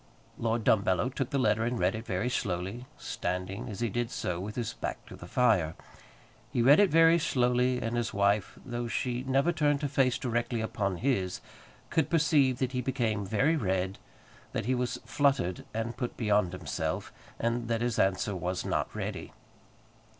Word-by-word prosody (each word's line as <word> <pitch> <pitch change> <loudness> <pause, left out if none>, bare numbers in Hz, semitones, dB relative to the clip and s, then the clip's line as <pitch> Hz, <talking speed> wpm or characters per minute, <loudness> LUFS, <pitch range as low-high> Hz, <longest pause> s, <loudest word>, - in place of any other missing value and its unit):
Lord 115 0 0
Dumbello 100 +2 +3
took 135 - -2
the 140 - 0
letter 110 -3 +2
and 120 +1 -1
read 90 +2 +2
it 110 +1 -6
very 95 +6 -1
slowly, 100 +2 -2
standing, 90 +5 -4
as 105 +2 -6
he 120 - +1
did 120 +2 -1
so, 85 -1 -3
with 105 +3 -5
his 115 -2 -2
back - - -5
to - - -10
the 90 - -11
fire. 90 -8 +2 0.8
He 125 -3 +1
read 140 +5 +7
it 205 -2 +5
very 165 +2 +6
slowly, 125 -3 +2
and 115 0 -2
his 120 -1 -1
wife, 100 0 +1
though 120 -2 -3
she 120 +2 -1
never 135 +5 +2
turned 145 -3 +1
her - - +2
face 135 -3 +2
directly 120 -1 -1
upon 100 -4 -1
his, 100 -6 0 0.5
could 155 -2 +2
perceive 150 -6 +3
that 130 -1 -1
he 125 -1 -1
became 115 -6 -1
very 135 +11 +2
red, 95 - -1 0.5
that - - -2
he 130 - +1
was 125 -1 -1
fluttered 140 -11 +1
and 115 +2 -3
put 125 -2 -4
beyond 105 -5 +2
himself, 85 -6 -3 0.2
and 115 0 -1
that 115 -1 0
his 120 -2 0
answer 95 +1 +1
was 90 0 -3
not - - -1
ready. - - -5
120 Hz, 180 wpm, -30 LUFS, 100-130 Hz, 0.8 s, read